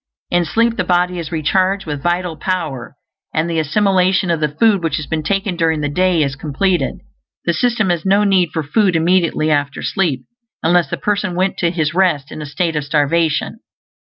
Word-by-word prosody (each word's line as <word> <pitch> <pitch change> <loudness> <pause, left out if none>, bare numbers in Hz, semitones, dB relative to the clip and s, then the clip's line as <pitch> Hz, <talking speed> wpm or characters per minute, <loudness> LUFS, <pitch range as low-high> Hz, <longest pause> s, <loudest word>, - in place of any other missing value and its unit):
In 175 0 +2
sleep 230 +7 +1
the - - +1
body 180 0 +1
is 165 -3 -6
recharged 185 +5 0
with 145 -3 -4
vital 175 0 -1
power, 155 -9 -4 0.4
and 155 +1 +1
the 165 -1 -1
assimilation 185 +2 +2
of 165 - 0
the 155 - +1
food 200 +6 +2
which 160 -3 0
has 155 - -4
been 160 +1 -2
taken 195 +3 -1
during 160 -2 +1
the 145 - -1
day 180 +1 +2
is 135 -1 -2
completed; 165 +6 -1 0.4
the 170 - +2
system 215 +1 +1
has 170 -2 -1
no 200 +2 +3
need 190 -4 +3
for 160 - -2
food 185 +4 +1
immediately 165 -2 +2
after 145 -1 -1
sleep, 150 -10 -1 0.4
unless 175 +1 +3
the 170 - -3
person 200 +3 -1
went 185 +2 0
to 170 - +2
his 160 -3 -1
rest 170 -6 +1
in - - -7
a 150 - -6
state 165 +2 -2
of 150 - -1
starvation. 150 +2 0
170 Hz, 195 wpm, -17 LUFS, 155-185 Hz, 0.4 s, no